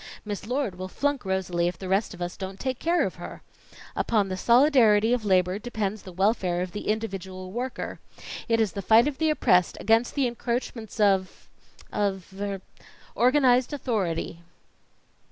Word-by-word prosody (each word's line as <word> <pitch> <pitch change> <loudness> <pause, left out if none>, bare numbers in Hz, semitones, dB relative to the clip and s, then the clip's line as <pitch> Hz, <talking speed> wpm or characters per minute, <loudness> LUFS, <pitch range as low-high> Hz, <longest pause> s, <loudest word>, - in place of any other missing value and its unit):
Miss 205 0 -5
Lord 245 -8 -2
will 185 - -4
flunk 280 +4 -1
Rosalie 185 -2 0
if 175 -1 -3
the 190 - -7
rest 195 +1 0
of 175 - -5
us 175 - -5
don't 190 0 -7
take 260 -1 -3
care 340 +1 +2
of - - -5
her. - - -8 0.5
Upon 210 -4 +1
the 185 - -2
solidarity 235 -1 +4
of 240 -3 -1
labor 185 0 +2
depends 215 -3 -3
the 185 - -10
welfare 185 -2 +1
of 180 - -6
the 210 - -6
individual 190 -4 -3
worker. 245 +4 -4 0.5
It 230 0 +3
is 220 -4 +2
the 200 - -5
fight 225 +6 +5
of 290 -2 -4
the 320 -1 +2
oppressed 180 - +3
against 225 +3 +2
the 280 -2 +2
encroachments 235 -2 -4
of 195 -3 +1 0.5
of 195 -2 -2
er 200 -2 -3 0.5
organized 255 0 +3
authority." 190 - -2
210 Hz, 165 wpm, -26 LUFS, 185-245 Hz, 0.5 s, fight